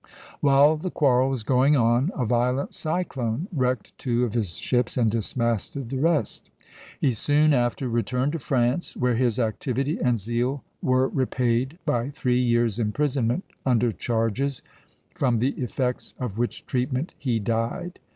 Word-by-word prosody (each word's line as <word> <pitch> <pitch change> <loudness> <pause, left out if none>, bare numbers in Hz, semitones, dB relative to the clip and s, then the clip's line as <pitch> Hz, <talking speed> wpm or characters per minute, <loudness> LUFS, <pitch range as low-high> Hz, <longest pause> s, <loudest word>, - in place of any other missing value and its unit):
While 145 +2 +5
the 185 +4 -4
quarrel 130 -5 +3
was 130 -4 -2
going 130 +5 +3
on, 120 +5 +3
a 125 - -1
violent 125 +4 0
cyclone 155 -4 -2
wrecked 130 -5 -1
two 120 -2 0
of 115 - -4
his 105 -8 -1
ships 125 0 0
and 115 -3 +3
dismasted 115 +2 -2
the 135 - -2
rest. 160 +1 0 0.5
He 130 - +2
soon 150 +6 +3
after 120 +1 0
returned 125 +4 0
to 165 - -3
France, 130 +3 0
where 125 -1 +2
his 120 -1 +1
activity 130 +5 -1
and 125 -2 +3
zeal 120 +6 -2 0.2
were 130 0 +3
repaid 130 +2 0
by 120 +2 0
three 125 -4 0
years' 120 -3 +2
imprisonment 125 - 0 0.2
under 120 -2 +2
charges, 115 +6 -1 0.5
from 125 -3 +1
the 125 +4 +2
effects 125 0 -3
of 115 -4 -4
which 120 - -2
treatment 130 +5 -2
he 125 -5 0
died. 115 - -2
125 Hz, 150 wpm, -25 LUFS, 120-135 Hz, 0.5 s, While